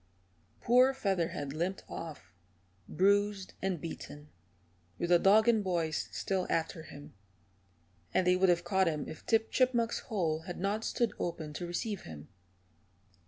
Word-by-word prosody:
Poor 255 +3 +5
Featherhead 170 - -1
limped 175 +5 -2
off, 140 - -8 0.6
bruised 200 +2 +2
and 185 -3 -1
beaten, 150 -2 -8 0.7
with 170 - -2
the 175 - +7
dog 215 +5 +5
and 225 -3 +4
boys 170 -5 -1
still 190 -2 -2
after 165 +1 -1
him, 145 -2 -12 1.0
and 185 - +2
they 180 0 +5
would 185 0 +3
have 175 0 +3
caught 190 +1 +2
him 155 -3 -2
if 155 - -9
Tip 225 -1 +2
Chipmunk's 240 -3 +2
hole 165 -7 -1
had 180 - -5
not 205 +4 -1
stood 230 -2 0
open 160 -3 -4
to 175 +3 -5
receive 200 +3 -3
him. 75 -2 -10
180 Hz, 145 wpm, -32 LUFS, 160-205 Hz, 1.0 s, the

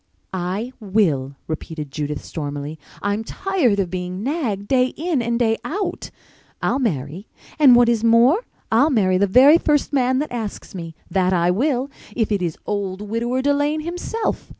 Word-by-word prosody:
"I 190 +7 -3
will," 175 - 0
repeated 155 -2 -6
Judith 150 0 -4
stormily. 145 0 -5 0.2
"I'm 205 +2 0
tired 265 - 0
of 185 -3 -1
being 185 +1 -4
nagged 240 - -2
day 255 0 +3
in 320 -3 0
and 235 0 0
day 225 -2 +2
out. 390 +5 -3 0.5
I'll 270 - 0
marry—and 205 - +1
what 240 0 +5
is 230 -2 +1
more 235 - +5 0.3
I'll 255 +7 +4
marry 190 -9 +2
the 200 - +3
very 270 - +7
first 295 -2 +1
man 260 -1 +2
that 300 +3 -2
asks 225 -4 -5
me—that 180 +2 -2
I 175 0 +3
will, 260 +5 0 0.2
if 225 -2 0
it 200 -2 +1
is 170 -3 -2
old 200 -2 -3
Widower 240 +3 -1
Delane 290 +2 +1
himself! 355 +7 -3
225 Hz, 155 wpm, -21 LUFS, 185-265 Hz, 0.5 s, very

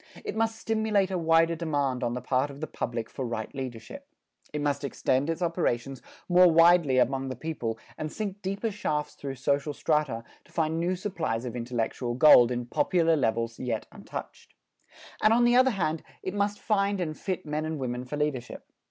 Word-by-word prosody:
It - - -4
must 225 0 +1
stimulate 220 -4 +1
a 185 - 0
wider 165 0 +3
demand 145 -6 -1
on 120 0 -1
the 125 - -5
part 130 +2 +1
of 140 0 -10
the 155 - -3
public 115 -6 -4
for 135 - -6
right 115 -3 -4
leadership. 135 - -7 0.4
It 150 - -3
must 145 -1 -1
extend 135 +1 0
its 165 +2 -1
operations 135 -7 -1 0.3
more 180 -1 +6
widely 165 -4 +5
among 135 +1 +1
the 130 - -4
people 120 -5 -4 0.2
and 155 0 -3
sink 205 -2 -5
deeper 195 +4 -2
shafts 155 -8 -2
through 135 -1 -6
social 140 +3 0
strata 150 -7 0 0.2
to - - -22
find 160 0 0
new 175 +2 0
supplies 160 - -3
of 120 - -5
intellectual 120 0 -2
gold 125 -3 +8
in 120 0 -2
popular 165 +5 +2
levels 115 -4 -1
yet 120 -4 -2
untouched. - - -9 0.7
And 215 - +5
on 240 +1 +4
the 240 0 +4
other 260 +1 +6
hand, 165 -8 -1 0.2
it 185 - -3
must 205 0 0
find 200 -2 +1
and 155 -4 -2
fit 185 0 -4
men 150 0 -2
and 155 0 -3
women 125 -2 -3
for 145 +4 -5
leadership. 145 -5 -3
150 Hz, 185 wpm, -28 LUFS, 125-180 Hz, 0.7 s, gold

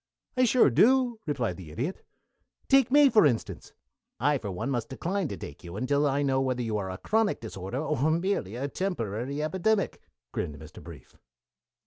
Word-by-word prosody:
"I 255 0 +4
sure 240 - +4
do," 245 - +4
replied 125 - -1
the 90 -5 -10
Idiot. 130 - -4 0.6
"Take 270 -3 +5
me, 290 +2 +7
for 220 -5 +5
instance 125 -7 -1 0.3
" - - -59
"I 145 -2 +2
for 105 - -5
one 95 +9 -3
must 120 -4 -2
decline 180 +7 -2
to 100 - -6
take 70 - -9
you 85 +1 -8
until 140 +5 +1
I 140 +1 +1
know 135 -1 +1
whether 130 -2 -1
you 110 -2 -2
are 95 -2 -4
a 95 - -5
chronic 220 - +1
disorder, 100 0 -6
or 150 0 0
merely 165 - -1
a 135 +3 -2
temporary 140 - -3
epidemic," 190 +6 0 0.3
grinned 75 - -4
Mr. 80 +3 -12
Brief. 80 -6 -13
140 Hz, 180 wpm, -28 LUFS, -, 0.6 s, me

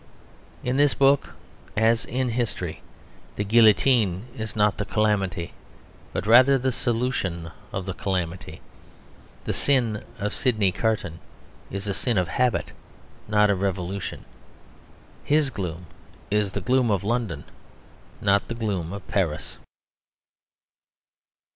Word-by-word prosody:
In 125 +1 0
this 145 0 +4
book, 140 0 +3 0.4
as 115 +1 +3
in 130 +1 -1
history, 110 -8 -3 0.5
the 105 - -1
guillotine 110 -2 +4
is 110 -4 -5
not 105 -1 +2
the - - +1
calamity, 100 -5 0 0.6
but - - -3
rather 130 +5 +7
the 130 0 0
solution 115 -9 -2 0.2
of 95 -2 -4
the 95 - -3
calamity. 90 -4 -3 0.8
The - - -2
sin 120 -7 +1
of 105 +1 -2
Sydney 110 -7 +2
Carton 95 -5 -1 0.5
is 100 +1 -5
a 100 - 0
sin 120 +2 -1
of 90 -2 +1
habit, 125 -3 +1 0.6
not 105 -1 +4
of 95 -2 -1
revolution. 95 0 -3 1.0
His 150 -2 +2
gloom 90 -4 -5 0.5
is 105 -2 +1
the - - -2
gloom 125 -1 +2
of 100 -3 +1
London, 110 -9 -1 0.8
not 100 0 +2
the 115 - -4
gloom 100 -7 -2
of 100 -2 -8
Paris. 85 -7 -2
105 Hz, 120 wpm, -25 LUFS, 95-120 Hz, 1.0 s, rather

